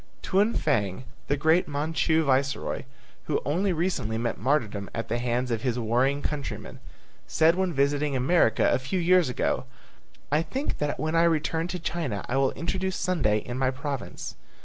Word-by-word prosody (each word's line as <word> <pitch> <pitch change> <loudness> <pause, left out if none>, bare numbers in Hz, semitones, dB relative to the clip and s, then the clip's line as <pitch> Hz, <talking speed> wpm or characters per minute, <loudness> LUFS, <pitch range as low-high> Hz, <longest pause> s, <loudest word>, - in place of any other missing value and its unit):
Tuan 205 +4 +2
Fang, 105 -8 0 0.2
the 145 - +1
great 160 +5 +3
Manchu 160 +2 +1
viceroy 135 -1 0 0.4
who 150 - 0
only 185 +7 +1
recently 165 - -1
met 115 0 -2
martyrdom 110 -7 0
at 115 -1 -4
the 120 - 0
hands 125 +1 -1
of 115 -2 -1
his 125 -1 -1
warring 125 +5 +1
countrymen, 145 -2 -4 0.5
said 160 +1 +4
when 185 0 0
visiting 140 0 +1
America 130 -1 +3
a - - +2
few 130 +9 -3
years 180 -3 +4
ago, 125 - -1 0.7
"I 150 +2 +3
think 260 - -3
that 150 -2 -1
when 155 +3 -1
I 165 - +4
return 165 0 +1
to 180 +1 -3
China 150 - -3
I 125 - -1
will 135 -1 +3
introduce 190 +2 -2
Sunday 140 - +1
in 125 +1 -4
my 130 -1 +2
province." 135 0 -5
145 Hz, 170 wpm, -27 LUFS, 125-165 Hz, 0.7 s, said